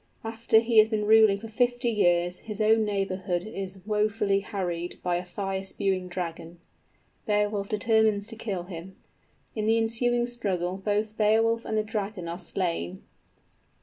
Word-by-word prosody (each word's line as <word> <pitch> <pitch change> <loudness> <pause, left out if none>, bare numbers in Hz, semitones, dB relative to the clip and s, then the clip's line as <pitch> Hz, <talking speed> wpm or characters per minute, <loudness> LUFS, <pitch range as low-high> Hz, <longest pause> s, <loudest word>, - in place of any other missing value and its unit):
After 225 0 +2
he 225 0 +5
has 215 0 +6
been 215 -2 -1
ruling 215 -2 +6
for 225 - -8
fifty 245 +1 +1
years, 175 -4 +2
his 215 -1 -7
own 220 +1 +4
neighborhood 190 -3 -1
is 195 -3 -7
wofully 210 -1 +1
harried 180 -4 -4
by 175 -1 +1
a 175 - -4
fire 190 +1 -4
spewing 190 -1 -1
dragon. 175 -1 -5 0.7
Beowulf 205 -1 0
determines 220 -1 +2
to 225 - -8
kill 200 -5 -4
him. 180 +1 -9 0.6
In 215 -1 -1
the 225 +1 +4
ensuing 240 +2 +1
struggle 190 -7 -2
both 210 +2 -1
Beowulf 225 +2 +3
and 220 - -1
the 215 - +2
dragon 210 -4 -4
are 170 +2 -5
slain. 165 - -3
205 Hz, 150 wpm, -27 LUFS, 185-220 Hz, 0.7 s, has